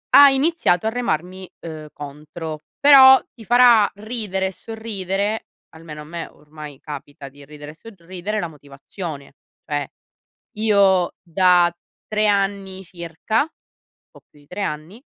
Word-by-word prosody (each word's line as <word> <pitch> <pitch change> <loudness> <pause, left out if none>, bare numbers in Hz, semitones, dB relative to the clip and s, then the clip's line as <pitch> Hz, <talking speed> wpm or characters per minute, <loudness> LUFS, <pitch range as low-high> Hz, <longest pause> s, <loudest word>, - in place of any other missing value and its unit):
ha 285 0 +10
iniziato 270 - +1
a - - +2
remarmi, 185 -6 -3
uhm, 155 -2 -8
contro; 150 +2 -8 0.2
però 265 -2 +8
ti 225 -4 -14
farà 240 -3 +6
ridere 205 -3 -3
e - - -5
sorridere, 205 0 -4 0.2
almeno 160 -2 -11
a - - -9
me 165 +2 -7
ormai 150 -1 -12
capita 145 -1 -9
di 140 +1 -16
ridere 150 0 -11
e - - -18
sorridere 185 +1 -6
la 175 - -3
motivazione: 145 +1 -9 0.3
cioè 145 -2 -3 0.7
io 200 -4 +3
da 175 0 +3 0.3
3 215 0 +1
anni 195 -1 -1
circa 175 - -3 0.6
po' - - -18
più - - -22
di 145 - -23
3 180 +6 -6
anni, 160 - -6
185 Hz, 135 wpm, -21 LUFS, 155-215 Hz, 0.7 s, ha